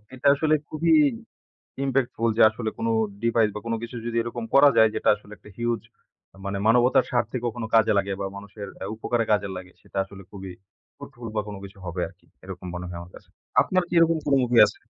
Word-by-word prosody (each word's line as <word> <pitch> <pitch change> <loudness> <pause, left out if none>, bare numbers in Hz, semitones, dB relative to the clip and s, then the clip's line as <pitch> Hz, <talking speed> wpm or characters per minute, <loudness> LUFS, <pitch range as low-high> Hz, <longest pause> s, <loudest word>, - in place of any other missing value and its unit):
এটা 130 +2 -1
আসলে 155 +1 +2
খুবই 165 +2 0 0.9
Impactful 125 -4 0
যে, - - +5
আসলে 110 0 -4
কোন 115 - -1 0.3
ডিভাইস 115 -2 +3
বা 105 - -5
কোন 115 - 0
কিছু 115 +1 -6
যদি 115 - -3
এরকম 120 0 -5
করা 140 +1 +8
যায় 110 - +7
যেটা 110 - -1
আসলে 105 0 -17
একটা 105 - -17
Huge 120 -1 -1 0.6
মানে 100 0 -2
মানবতার 120 +3 +4
স্বার্থে 120 0 0
কখনো 120 -1 -3
কাজে 110 -1 +5
লাগে 100 0 -1
বা 100 - -1
মানুষের 100 0 -9 0.3
উপকারে 115 +1 0
কাজে 100 -1 +1
লাগে 90 0 -9
সেটা 95 - -7
আসলে 95 0 -12
খুবই 95 -2 -8 0.4
ফ্রুটফুল 120 -1 -9
বা - - +3
কোন 100 - -6
কিছু 100 0 -12
হবে 90 +1 -4
আরকি - - -23 0.2
এরকম 90 -1 -8
মনে 90 0 -5
হয় 85 -1 -6
আমার 85 +1 -12
কাছে। - - -16 0.3
আপনার 185 0 +1
কি - - -16
এরকম 165 0 +4
কোনো 140 - +4
মুভি 120 -1 +2
আছে? 105 - -8
115 Hz, 200 wpm, -25 LUFS, 100-120 Hz, 0.9 s, করা